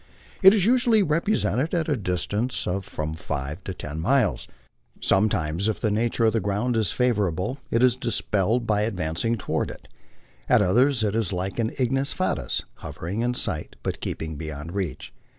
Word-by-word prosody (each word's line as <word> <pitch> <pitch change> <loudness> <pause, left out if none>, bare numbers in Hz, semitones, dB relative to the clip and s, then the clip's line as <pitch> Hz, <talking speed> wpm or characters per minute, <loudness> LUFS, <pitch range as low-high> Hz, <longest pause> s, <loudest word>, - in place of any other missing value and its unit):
It 190 -1 +10
is 195 -4 +2
usually 235 -2 +4
repre 165 +6 +1
sented 140 +10 0
at 160 - -2
a 150 - +2
distance 105 +4 -1
of 95 +1 -2
from 75 0 -4
five 75 +1 -5
to 95 - -3
ten 75 -1 -6
miles. 125 +7 +1 0.5
Sometimes, 95 -2 +1
if 110 - -2
the 110 - 0
nature 115 +2 +1
of 110 - +3
the 115 - +2
ground 105 +5 -1
is 110 -6 +1
favorable, 105 - 0
it 115 +2 +2
is 125 -1 +4
dispelled 115 -1 0
by 105 -2 +1
advancing 100 +1 -1
toward 100 - -2
it; - - -11 0.6
at - - +6
others 120 +5 +3
it 105 -2 +1
is 110 -5 0
like 95 +3 -3
an 115 -1 +1
ignis 135 +2 0
fatutis, 70 - -1
hovering 95 +7 -5
in 125 +1 0
sight, 75 -9 -3
but - - -3
keeping 80 -1 -4
beyond 75 +1 -6
reach. 95 -5 -4
110 Hz, 175 wpm, -25 LUFS, 90-125 Hz, 0.6 s, It